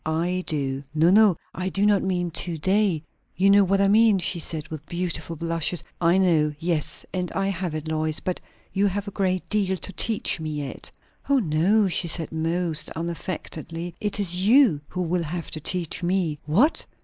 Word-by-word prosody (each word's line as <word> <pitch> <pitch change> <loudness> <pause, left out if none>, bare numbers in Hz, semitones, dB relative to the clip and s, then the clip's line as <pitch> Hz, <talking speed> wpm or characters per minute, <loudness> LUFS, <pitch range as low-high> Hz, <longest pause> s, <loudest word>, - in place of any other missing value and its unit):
I 170 +4 -1
do!" 135 -3 -1
"No, 160 +3 +4
no; 205 -4 +5 0.2
I 185 +1 -3
do 200 +2 +1
not 205 -2 +4
mean 180 -2 -1
to 170 0 0
day. 190 -1 +1 0.3
You 195 +2 +4
know 200 0 +6
what 195 +1 +1
I 200 - +4
mean!" 215 0 +5
she 180 -1 -1
said, 155 -1 -1
with 155 -2 -7
beautiful 170 -2 -3
blushes. 165 +1 -2 0.2
"I 170 +2 +4
know. 160 -5 +2
Yes, 165 -1 -1
and 180 -2 -2
I 195 0 0
have 180 -4 -3
it, 155 0 -5
Lois. 155 0 -1
But 185 - -3 0.3
you 200 +1 +2
have 200 +1 -3
a - - -4
great 185 -2 -1
deal 195 -3 0
to 195 - -5
teach 220 -6 +1
me 155 -1 -4
yet." 145 -2 -6 0.4
"O 280 - +4
no!" 195 +2 +2
she 175 -1 0
said 165 0 +1
most 165 0 -1
unaffectedly. 170 0 -5
"It 210 0 -2
is 180 -2 +2
you 220 - +5
who 180 +2 -3
will 175 +1 0
have 170 +2 -5
to 155 - -3
teach 170 +1 -1
me." 175 -4 0
"What?" 225 - +2
175 Hz, 190 wpm, -24 LUFS, 160-195 Hz, 0.4 s, know